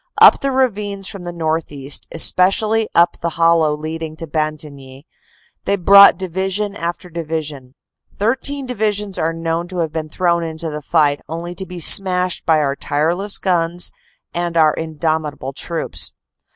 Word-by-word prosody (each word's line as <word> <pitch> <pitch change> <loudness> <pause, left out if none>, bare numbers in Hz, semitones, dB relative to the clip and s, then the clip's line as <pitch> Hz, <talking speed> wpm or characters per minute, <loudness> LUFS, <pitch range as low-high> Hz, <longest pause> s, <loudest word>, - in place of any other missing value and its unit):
Up - - +7
the 275 - 0
ravines 210 -7 -1
from 190 -3 -7
the 175 - -4
northeast, 155 -4 -3
espe 180 +2 +4
cially 220 +2 0
up 170 +1 +4
the 170 - -1
hollow 165 -2 +3
leading 155 +1 -6
to 165 - -6
Bantigny, 150 -3 -5 0.6
they 200 - +1
brought 200 -1 +7
division 190 +3 -2
after 175 0 -5
division; 155 -5 -5 0.4
13 265 +6 -2
divisions 210 -5 -2
are 160 +1 0
known 165 +1 -3
to 185 0 -8
have 165 -3 -1
been 155 -1 -5
thrown 170 +1 0
into 160 -1 -5
the 150 0 -6
fight, 145 -1 +1
only 170 +2 -5
to 185 +2 -8
be 180 0 -8
smashed 180 +1 +4
by 160 -1 +4
our 140 -2 0
tireless 170 +9 -1
guns 175 -1 -1 0.4
and 170 -1 -2
our 155 -2 +4
in 160 -1 -6
domitable 150 -4 -2
troops. 165 +4 -2
170 Hz, 155 wpm, -18 LUFS, 155-190 Hz, 0.6 s, Up